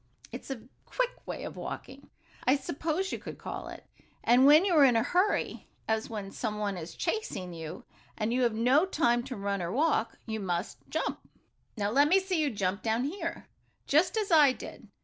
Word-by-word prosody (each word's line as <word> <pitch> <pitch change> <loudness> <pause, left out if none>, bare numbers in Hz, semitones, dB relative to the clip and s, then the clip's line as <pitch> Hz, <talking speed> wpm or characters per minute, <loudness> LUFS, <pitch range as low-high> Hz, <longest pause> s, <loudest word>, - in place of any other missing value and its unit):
It - - -6
is - - -14
a 255 -5 -5 0.2
quick - - -3
way - - -5
of - - -6
walking, - - -7 0.4
I 260 - +6
suppose 315 +7 -2
you - - -3
could - - -8
call - - -6
it, - - -10 0.4
and 250 +3 +6
when 305 +5 +7
you 380 - +2
are 305 -3 +7
in 255 -3 +6
a 225 - +3
hurry, 370 +9 0 0.2
as 220 0 0
when 205 -3 -5
some 215 -1 -3
one 205 -2 -1
is 165 -1 -7
chasing 335 - -3
you, 160 +1 -7 0.3
and 220 +1 -1
you 255 - +1
have 235 -3 +2
no 260 +10 +4
time 240 -9 +2
to 265 -2 -5
run 200 -1 -2
or 170 0 -3
walk, 280 - +1
you 220 -1 -3
must 180 -1 -3
jump. - - -2 0.6
Now 205 -1 0
let 285 +5 +5
me 370 +5 +5
see 375 -4 -1
you 295 - +2
jump 200 -3 -2
down 225 +2 0
here, 335 +3 -4 0.4
just 325 +9 +3
as 420 -3 -1
I 295 -5 +7
did. - - -10
250 Hz, 205 wpm, -29 LUFS, 210-320 Hz, 0.6 s, when